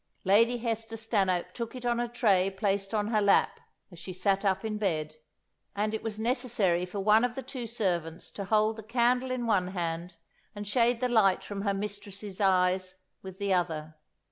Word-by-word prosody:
Lady 230 Hz, +5 st, +4 dB
Hester 225 Hz, -1 st, -3 dB
Stanhope 195 Hz, -5 st, 0 dB
took 235 Hz, 0 st, -5 dB
it 250 Hz, -1 st, -7 dB
on 240 Hz, -1 st, +1 dB
a 240 Hz, -, 0 dB
tray 200 Hz, -6 st, +3 dB
placed 195 Hz, 0 st, -1 dB
on 210 Hz, -1 st, 0 dB
her 215 Hz, -2 st, +2 dB
lap 200 Hz, -, +3 dB, 0.3 s
as 175 Hz, -, -12 dB
she 185 Hz, +2 st, -7 dB
sat 195 Hz, +2 st, +1 dB
up 195 Hz, +1 st, +1 dB
in 215 Hz, -1 st, -3 dB
bed, 155 Hz, -6 st, -1 dB, 0.6 s
and 210 Hz, +2 st, -1 dB
it 220 Hz, -, -2 dB
was 220 Hz, -1 st, -5 dB
necessary 220 Hz, -7 st, +1 dB
for 200 Hz, +3 st, -5 dB
one 215 Hz, +3 st, +4 dB
of 245 Hz, 0 st, 0 dB
the 265 Hz, -, -5 dB
two 245 Hz, -3 st, -6 dB
servants 175 Hz, -8 st, -2 dB
to 200 Hz, -, -6 dB
hold 215 Hz, +2 st, +2 dB
the -, -, -6 dB
candle 245 Hz, +3 st, +1 dB
in 255 Hz, -1 st, -2 dB
one 200 Hz, -5 st, +2 dB
hand 170 Hz, -1 st, -4 dB, 0.4 s
and 205 Hz, 0 st, -6 dB
shade 235 Hz, +2 st, +2 dB
the 250 Hz, -, +2 dB
light 215 Hz, -6 st, +3 dB
from 200 Hz, -1 st, -5 dB
her 200 Hz, -1 st, 0 dB
mistress's 205 Hz, 0 st, -6 dB
eyes 185 Hz, -1 st, +2 dB, 0.3 s
with 190 Hz, -1 st, -9 dB
the 200 Hz, -1 st, 0 dB
other. 160 Hz, -3 st, -1 dB
205 Hz, 195 wpm, -29 LUFS, 185-230 Hz, 0.6 s, Lady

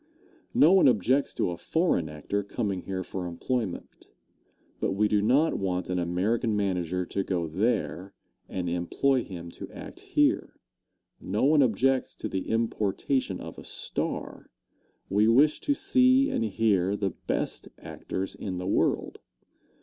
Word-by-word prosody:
No 160 Hz, +5 st, +6 dB
one 190 Hz, -6 st, +6 dB
objects 130 Hz, +4 st, +2 dB
to -, -, 0 dB
a 85 Hz, -, -5 dB
foreign 160 Hz, -, 0 dB
actor 75 Hz, +7 st, -3 dB
coming 100 Hz, -2 st, -3 dB
here 95 Hz, -1 st, -4 dB
for 90 Hz, 0 st, -5 dB
employment, 105 Hz, +3 st, -4 dB, 0.7 s
but -, -, 0 dB
we 105 Hz, +2 st, +2 dB
do 105 Hz, -1 st, +2 dB
not 135 Hz, +9 st, +3 dB
want 90 Hz, -2 st, -2 dB
an 90 Hz, -, 0 dB
American 105 Hz, +7 st, 0 dB
manager 90 Hz, -3 st, -1 dB
to 100 Hz, +2 st, -2 dB
go 90 Hz, -3 st, -1 dB
there, 100 Hz, +1 st, -1 dB, 0.3 s
and 90 Hz, -2 st, -3 dB
employ 100 Hz, +10 st, +1 dB
him 85 Hz, -3 st, -8 dB
to -, -, -9 dB
act -, -, -10 dB
here. -, -, +1 dB, 0.6 s
No 100 Hz, +3 st, -2 dB
one 150 Hz, +1 st, +5 dB
objects 130 Hz, +2 st, +2 dB
to -, -, -4 dB
the 95 Hz, -, -4 dB
importation 115 Hz, -1 st, 0 dB
of -, -, -8 dB
a -, -, -10 dB
star. -, -, -4 dB, 0.6 s
We 105 Hz, +3 st, +3 dB
wish 140 Hz, +7 st, +4 dB
to 285 Hz, -, 0 dB
see 260 Hz, 0 st, +4 dB
and 115 Hz, -, 0 dB
hear 100 Hz, -3 st, +1 dB
the 100 Hz, -2 st, -1 dB
best -, -, -3 dB
actors 95 Hz, +1 st, -5 dB
in 95 Hz, -3 st, -5 dB
the 90 Hz, -, -4 dB
world. 95 Hz, -, 0 dB
100 Hz, 150 wpm, -27 LUFS, 90-125 Hz, 0.7 s, No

